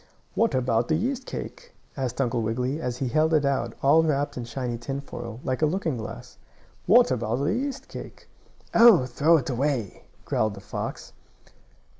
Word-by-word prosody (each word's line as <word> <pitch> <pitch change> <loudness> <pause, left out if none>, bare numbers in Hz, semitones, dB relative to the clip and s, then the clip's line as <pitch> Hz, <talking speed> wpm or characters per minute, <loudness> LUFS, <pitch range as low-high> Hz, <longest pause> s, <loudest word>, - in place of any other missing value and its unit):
"What 230 - +1
about 120 -2 +1
the 155 - +2
yeast 250 - -2
cake?" - - -7 0.2
asked 130 -2 -3
Uncle 120 -3 +1
Wiggily, 125 +7 -2
as 125 -3 -3
he 135 - -2
held 155 +5 +2
it 150 -2 +2
out, 130 -4 -1
all 145 +4 +6
wrapped 145 -3 0
in 120 - -5
shiny 120 0 -4
tinfoil, 120 -3 -6
like 130 +2 -2
a 155 - +4
looking 160 -5 -1
glass. 115 +3 -8 0.5
"What - - +6
about 110 +2 0
the 140 +8 0
yeast 270 +2 -3
cake?" - - -10 0.5
"Oh, 225 - +7
throw 150 +7 +3
it 135 -2 -3
away!" 125 -5 -2 0.2
growled 110 -1 0
the - - -9
fox. - - -6
135 Hz, 170 wpm, -26 LUFS, 120-160 Hz, 0.5 s, Oh